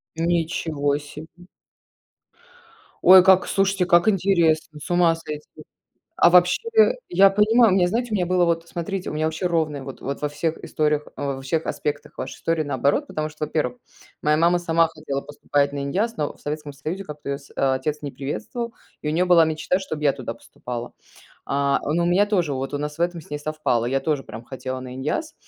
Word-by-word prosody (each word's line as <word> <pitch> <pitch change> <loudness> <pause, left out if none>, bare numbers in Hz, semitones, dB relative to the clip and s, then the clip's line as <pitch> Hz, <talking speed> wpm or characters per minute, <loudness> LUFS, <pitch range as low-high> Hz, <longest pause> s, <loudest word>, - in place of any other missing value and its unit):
Ничего 160 -3 0
себе. 155 +4 -12 1.6
Ой, 185 0 +9
как 190 0 +5
слушайте, 195 -1 +1
как 175 +1 +4
интересно, 170 -6 +1
с - - -9
ума 175 -2 +4
сойти. 150 -2 -9 0.6
А - - +7
вообще 180 - +5 0.5
я 195 +3 +6
понимаю, 215 +3 +4
у - - +3
меня, 180 -2 +3
знаете, 240 +6 -1
у - - +1
меня 180 -3 +1
было 180 0 +2
вот, 165 0 -1
смотрите, 180 +3 -4
у - - -6
меня 155 +1 0
вообще 160 +3 -2
ровное 155 -5 0
вот 135 0 -9
вот 140 +1 -4
во 150 - -1
всех 155 +2 -2
историях 150 -1 0
а, 140 -1 -2
в - - -5
во - - -8
всех 155 +4 -1
аспектах 145 0 -4
вашей - - -5
истории 165 -1 0
наоборот, 145 - 0
потому 155 - -4
что, 155 0 -4
во-первых, 145 -5 -2 0.5
моя 150 0 +3
мама 170 +2 +4
сама 165 -1 +2
хотела 155 -4 -5
поступать 145 -1 -1
на 140 - -3
иняз, 210 +11 -1
но 150 - -2
в - - -23
Советском 150 -1 -5
Союзе 155 +8 -5
как-то 150 -4 -8
её 140 - -1
сь 140 -1 -18
а, 135 -1 +2
отец 150 +3 -3
не 145 - -4
приветствовал, 145 - -5 0.3
и 150 - -1
у - - 0
нее 175 +4 +2
была 175 -2 +6
мечта, 155 +3 0
чтоб 155 -5 -5
я 145 -2 +4
туда 125 -4 -6
поступала. 120 +1 -8 0.5
А, 140 0 +1
но 170 +3 +1
у - - +1
меня 185 +4 +3
тоже 180 -8 0
вот 135 +1 -4
у - - -1
нас 150 +1 -5
в - - -11
этом 175 -1 -1
с - - -20
ней 150 - -3
совпало. 150 -6 -1
Я 135 +2 0
тоже 145 0 -1
прям 110 -1 -9
хотела 130 +1 -6
на 125 0 -8
иняз, 155 - -3
155 Hz, 205 wpm, -23 LUFS, 145-175 Hz, 1.6 s, Ой